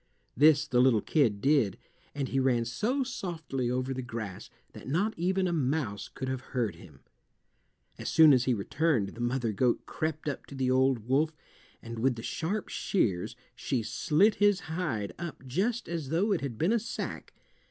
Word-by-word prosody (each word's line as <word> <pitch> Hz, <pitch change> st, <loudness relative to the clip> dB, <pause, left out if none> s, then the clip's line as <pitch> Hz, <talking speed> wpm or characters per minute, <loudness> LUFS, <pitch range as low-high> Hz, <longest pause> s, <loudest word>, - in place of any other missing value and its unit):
This 150 Hz, +2 st, +5 dB
the 125 Hz, -3 st, +3 dB
little 125 Hz, -4 st, +4 dB
kid 115 Hz, -10 st, +2 dB
did, 135 Hz, -8 st, +3 dB, 0.4 s
and 140 Hz, -2 st, -2 dB
he 135 Hz, -, 0 dB
ran 125 Hz, -3 st, +2 dB
so 245 Hz, -, 0 dB
softly 160 Hz, -, -3 dB
over 130 Hz, +1 st, -1 dB
the 130 Hz, -, -4 dB
grass 110 Hz, -6 st, -6 dB, 0.2 s
that -, -, -11 dB
not 190 Hz, +11 st, +1 dB
even 185 Hz, +2 st, +1 dB
a 175 Hz, -, -1 dB
mouse 130 Hz, -9 st, -1 dB
could 130 Hz, -, -5 dB
have 130 Hz, -1 st, -2 dB, 0.2 s
heard 115 Hz, -5 st, +1 dB
him. -, -, -15 dB, 1.0 s
As -, -, -3 dB
soon 160 Hz, -3 st, +7 dB
as 125 Hz, -1 st, +3 dB
he 125 Hz, -, +2 dB
returned 120 Hz, 0 st, 0 dB
the 115 Hz, -, -9 dB
mother 120 Hz, -1 st, 0 dB
goat 120 Hz, +4 st, +1 dB
crept 155 Hz, -1 st, -3 dB
up 145 Hz, -, -4 dB
to 140 Hz, -, -10 dB
the 130 Hz, -1 st, 0 dB
old 130 Hz, -3 st, +2 dB
wolf, 150 Hz, +5 st, +2 dB, 0.5 s
and 115 Hz, 0 st, -6 dB
with 125 Hz, +1 st, +2 dB
the 115 Hz, -, -8 dB
sharp 195 Hz, +7 st, -2 dB
shears 100 Hz, -, -1 dB, 0.2 s
she 125 Hz, -4 st, -2 dB
slit 180 Hz, -, +3 dB
his 205 Hz, -2 st, +4 dB
hide 155 Hz, -, -3 dB
up 170 Hz, -5 st, -7 dB
just 205 Hz, -, -1 dB
as 165 Hz, -5 st, -4 dB
though 180 Hz, +8 st, +1 dB
it 190 Hz, -, +1 dB
had 135 Hz, -5 st, -4 dB
been 175 Hz, -, +2 dB
a 235 Hz, -, +3 dB
sack. 225 Hz, +2 st, -6 dB
135 Hz, 185 wpm, -29 LUFS, 120-165 Hz, 1.0 s, soon